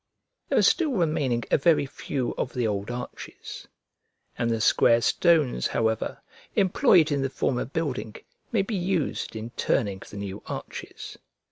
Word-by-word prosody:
There - - +2
are - - +5
still 315 -6 +3
remaining 150 - +1
a - - +4
very 155 -1 +4
few 135 -2 -3
of - - -3
the 125 -2 0
old 100 -1 -2
arches; 125 0 -7 0.7
and 115 - -1
the 115 -1 0
square 115 +2 +4
stones, 155 - +3
however, 110 -1 -1 0.4
employed 180 -4 +4
in 140 -1 +1
the 135 - 0
former 125 -1 -1
building, 135 -7 -3 0.4
may 220 -5 +2
be 205 - -5
used 180 - -1
in 110 +2 -6
turning 100 -6 0
the 105 - -9
new 100 0 -5
arches. - - -7
130 Hz, 150 wpm, -26 LUFS, 115-165 Hz, 0.7 s, are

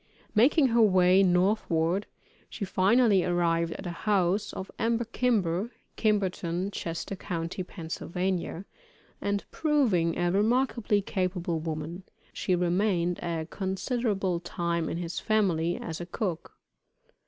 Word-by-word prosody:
Making 265 +5 +5
her 235 0 +4
way 185 -2 +5
northward, 180 -1 +2 0.4
she 200 - -4
finally 200 +1 +4
arrived 170 -2 +1
at - - -8
the 175 - -4
house 195 +2 +1
of 190 - -7
Emmer 230 +1 +1
Kimber, 215 -5 0 0.3
Kimberton, 190 -3 0
Chester 170 +1 -4
county, 175 -1 -4
Pa., 180 -1 -8 1.4
and 200 0 -1
proving 235 - +2
a 175 0 +1
remarkably 220 0 +2
capable 180 -4 -1
woman, 160 +2 -5 0.3
she 185 - 0
remained 180 0 +1
a 165 -2 -3
considerable 195 -1 -1
time 170 -1 -2
in - - -3
his 170 0 -4
family, 175 -6 +1
as 165 0 -5
a 175 - -6
cook. 180 -3 -4
185 Hz, 120 wpm, -28 LUFS, 170-210 Hz, 1.4 s, Making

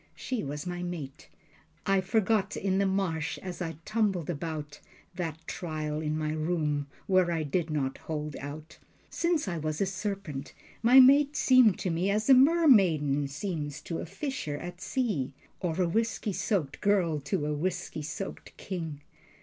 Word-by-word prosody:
She 255 -3 -3
was 145 +2 -5
my 175 0 -4
mate. 160 -6 -6 0.6
I 195 -1 +3
forgot 205 +1 +1
in 190 0 0
the 200 - +3
marsh, 185 -5 -1
as 180 -1 -6
I 165 -2 -3
tumbled 205 -7 0
about, 150 -2 -5 0.3
That 165 -4 -3
trial 155 -3 -3
in 155 0 -1
my 155 -1 -1
room, 155 -2 -1 0.2
where 185 -2 +3
I 165 -2 0
did 160 +3 -1
not 140 -3 -2
hold 150 -2 -4
out. 150 +3 -8 0.3
Since 340 -6 0
I 170 -3 -2
was 155 0 -2
a 195 - +2
serpent, 195 -7 -4 0.3
my 245 +4 +8
mate 280 +3 +7
seemed 255 -7 +5
to 185 - 0
me 175 +4 0
As 215 +6 +2
a - - +11
mermaiden 200 - +5
seems 150 -1 -4
to 165 - -4
a - - -5
fisher 195 - -4
at 175 +3 -8
sea, 195 - -1 0.3
Or 175 -1 -2
a 180 - +3
whisky 225 +2 -1
soaked 175 - -1
girl 185 -7 +2
to 140 +1 -2
a 150 - -1
whisky 175 +1 -3
soaked 165 +6 -6
king. 165 -6 -5
175 Hz, 165 wpm, -29 LUFS, 150-200 Hz, 0.6 s, a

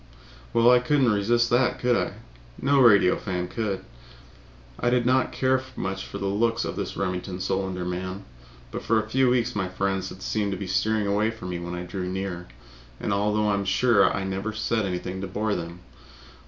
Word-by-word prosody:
Well, 115 +1 +5
I 125 - +6
couldn't 130 -1 +2
resist 120 +4 +2
that, 120 +1 +3
could 125 0 +2
I? - - -1 0.5
No 140 +1 +3
radio 100 -7 +6
fan 90 -2 -3
could. 100 -1 -3 0.9
I 120 - +2
did 120 -1 +2
not 130 +1 +2
care 130 0 +1
much 95 0 -4
for - - -6
the - - -4
looks 115 +4 +1
of - - -4
this - - -4
Remington 90 -1 -3
Solander 95 -1 -2
man, 95 +2 -4 0.5
but - - -4
for 115 0 +2
a 110 - -4
few 130 +3 +3
weeks 120 -1 +1
my 95 -3 -1
friends 95 0 -1
had 95 - -10
seemed 105 -2 -1
to - - -4
be 100 - -5
steering 110 +2 +1
away 105 +2 +1
from 110 -5 -7
me 90 -1 -3
when 85 0 -5
I 90 - -4
drew 90 +1 -4
near, 95 -2 -4 0.5
although 105 +1 +1
I - - +2
am 100 0 0
sure 100 0 +4
I 100 - -2
never 95 +3 -3
said 110 -1 0
anything 90 +1 -4
to 95 - -3
bore 105 +3 -1
them. 85 0 -5
100 Hz, 195 wpm, -25 LUFS, 95-115 Hz, 0.9 s, I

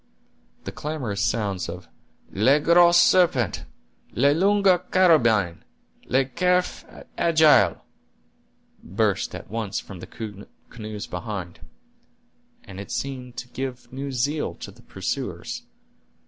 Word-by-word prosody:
The - - -6
clamorous 130 -10 -4
sounds 100 +1 -1
of 90 +2 -8 0.4
"Le 130 +9 +3
Gros 170 +2 +5
Serpent!" 165 - +3 0.5
"La 140 +4 +4
Longue 195 +2 +3
Carabine!" 115 - +3 0.4
"Le 130 +2 +2
Cerf 180 0 +1 0.4
Agile!" 160 -2 +4 1.0
burst 100 +2 -1
at - - -10
once 110 -3 -3
from 95 -3 -10
the 105 0 -9 0.2
canoes 105 -3 -7
behind, 90 -2 -6 1.0
and 100 0 -9
seemed 125 -3 -5
to 125 - -6
give 130 -1 -6
new 135 +1 -5
zeal 140 +5 -1
to - - -9
the - - -19
pursuers. - - -5
125 Hz, 105 wpm, -24 LUFS, 100-155 Hz, 1.0 s, Gros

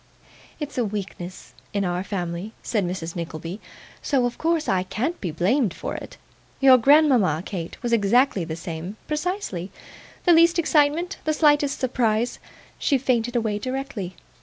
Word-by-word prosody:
'It's 295 -4 -4
a - - +3
weakness 195 -3 -6 0.2
in 200 -1 0
our 180 +1 -1
family,' 180 +1 -4
said 210 -4 0
Mrs. 175 -2 -4
Nickleby, 170 +3 -5 0.4
'so, 265 -4 +1
of 245 - -3
course, 325 -1 +1
I 190 -1 +2
can't 245 - -3
be 180 - -2
blamed 190 - +1
for - - -4
it. - - -8 0.4
Your 265 -2 +7
grandmama, 250 - +4
Kate, 170 -4 -5
was 240 -1 0
exactly 230 -1 +3
the 160 -1 -4
same 170 +3 -6
precisely. 300 - -3 0.6
The 350 - +7
least 335 +1 +5
excitement, 320 +2 +2
the 310 - +2
slightest 295 -2 +3
surprise 240 -2 0 0.4
she 280 - +2
fainted 245 -2 0
away 220 -3 0
directly. 255 -7 -4
230 Hz, 150 wpm, -24 LUFS, 185-285 Hz, 0.6 s, Your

